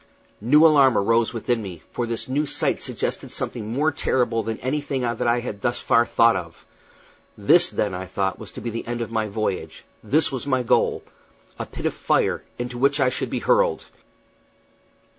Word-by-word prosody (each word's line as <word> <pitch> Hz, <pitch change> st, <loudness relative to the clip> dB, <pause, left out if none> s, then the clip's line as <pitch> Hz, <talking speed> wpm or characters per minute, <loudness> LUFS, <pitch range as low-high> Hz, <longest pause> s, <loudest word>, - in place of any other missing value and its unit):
New 150 Hz, +8 st, +5 dB
alarm 140 Hz, -6 st, +5 dB
arose 115 Hz, +3 st, +2 dB
within 115 Hz, 0 st, -1 dB
me, 90 Hz, -6 st, -8 dB
for 120 Hz, -, -3 dB
this 115 Hz, -1 st, -3 dB
new 145 Hz, +4 st, -1 dB
sight -, -, 0 dB
suggested -, -, -3 dB
something 110 Hz, -2 st, -4 dB
more 150 Hz, +6 st, +1 dB
terrible 125 Hz, -5 st, 0 dB
than 110 Hz, 0 st, -4 dB
anything 140 Hz, +1 st, -2 dB
that 120 Hz, -1 st, -1 dB
I 120 Hz, +1 st, +2 dB
had 100 Hz, -4 st, -6 dB
thus 120 Hz, -, -1 dB
far 115 Hz, 0 st, +3 dB
thought 115 Hz, -1 st, +4 dB
of. 85 Hz, -3 st, -7 dB, 0.7 s
This, 170 Hz, -, +5 dB
then, 100 Hz, -3 st, -2 dB
I 90 Hz, +1 st, -5 dB
thought, 95 Hz, +1 st, -2 dB
was 110 Hz, -4 st, -9 dB
to -, -, -8 dB
be 120 Hz, -, -4 dB
the 115 Hz, +1 st, -6 dB
end 120 Hz, 0 st, -3 dB
of 115 Hz, -, -4 dB
my 110 Hz, -1 st, -1 dB
voyage; 100 Hz, -6 st, -4 dB, 0.2 s
this 155 Hz, +2 st, +2 dB
was 135 Hz, +1 st, -5 dB
my 130 Hz, -2 st, +1 dB
goal 115 Hz, -, +1 dB, 0.6 s
a -, -, -4 dB
pit -, -, -8 dB
of -, -, 0 dB
fire, -, -, 0 dB, 0.2 s
into 120 Hz, 0 st, -5 dB
which 140 Hz, +2 st, +2 dB
I 130 Hz, -2 st, +3 dB
should 130 Hz, -, -3 dB
be -, -, -3 dB
hurled! -, -, +2 dB
120 Hz, 190 wpm, -23 LUFS, 110-135 Hz, 0.7 s, New